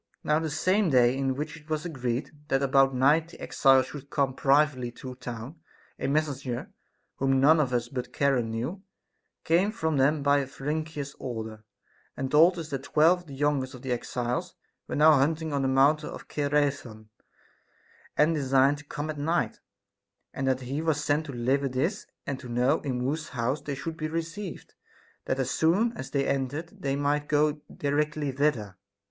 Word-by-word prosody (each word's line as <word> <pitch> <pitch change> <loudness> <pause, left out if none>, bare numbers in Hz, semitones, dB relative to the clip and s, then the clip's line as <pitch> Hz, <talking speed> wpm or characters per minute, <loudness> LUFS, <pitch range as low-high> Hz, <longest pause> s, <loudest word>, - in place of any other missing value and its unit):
Now 150 +1 +2
the 160 -1 -2
same 185 +5 +2
day 125 -2 +4
in 135 -1 0
which 150 +3 -4
it 155 -1 -16
was 155 0 -2
agreed 125 -6 -3 0.2
that 135 -2 +1
about 135 -1 +4
night 145 +6 +4
the 170 - -14
exiles 135 -2 +4
should 140 +1 -10
come 135 -2 0
privately 135 -2 +2
to 130 +1 -8
town, 125 +4 -8 0.4
a - - -1
messenger, 140 -4 -2 0.5
whom 135 0 +2
none 155 +4 +6
of 135 -4 +1
us 120 -1 0
all 120 - -19
but 125 -1 -4
Charon 135 -5 +1
knew, 125 - -4 0.6
came 180 +6 +3
from 160 -9 -1
them 140 +2 +2
by 140 0 +3
Pherenicus's 150 +1 -4
order, 110 -3 -6 0.5
and 130 0 -3
told 165 +4 +6
us 160 -2 -6
that 135 -1 -2
twelve 160 +5 +4
of 175 - -17
the 140 - -9
youngest 135 -2 0
of 125 - -12
the 130 - -3
exiles 125 +8 -2 0.3
were - - -4
now 155 +2 +7
hunting 155 +2 +1
on 140 - +1
the 135 - +1
mountain 140 +4 +3
Cithaeron, 140 -7 -2 1.1
and 155 +2 +4
designed 135 -1 +3
to 150 - -13
come 150 +1 -4
at 150 - -8
night, 165 +4 0 0.7
and 135 - -2
that 130 0 +1
he 135 +4 -3
was 155 -2 0
sent 150 +2 0
to - - -5
deliver 135 +3 0
this 145 +11 -2 0.2
and 135 -2 -3
to 125 - -10
know 125 +5 +2
in 130 -4 -3
whose 150 +4 -2
house 125 +5 -1
they 140 - -4
should 160 +4 -5
be 155 -2 -2
received, 165 +4 -5 0.5
that - - -1
as 130 -1 -1
soon 200 +9 +2
as 130 - -6
they 140 -1 0
entered 140 +5 -3
they 135 -1 0
might 145 +1 0
go 150 0 +3 0.2
di 145 - -3
rectly 150 -2 -1
thither. 120 -10 0
140 Hz, 185 wpm, -27 LUFS, 130-155 Hz, 1.1 s, now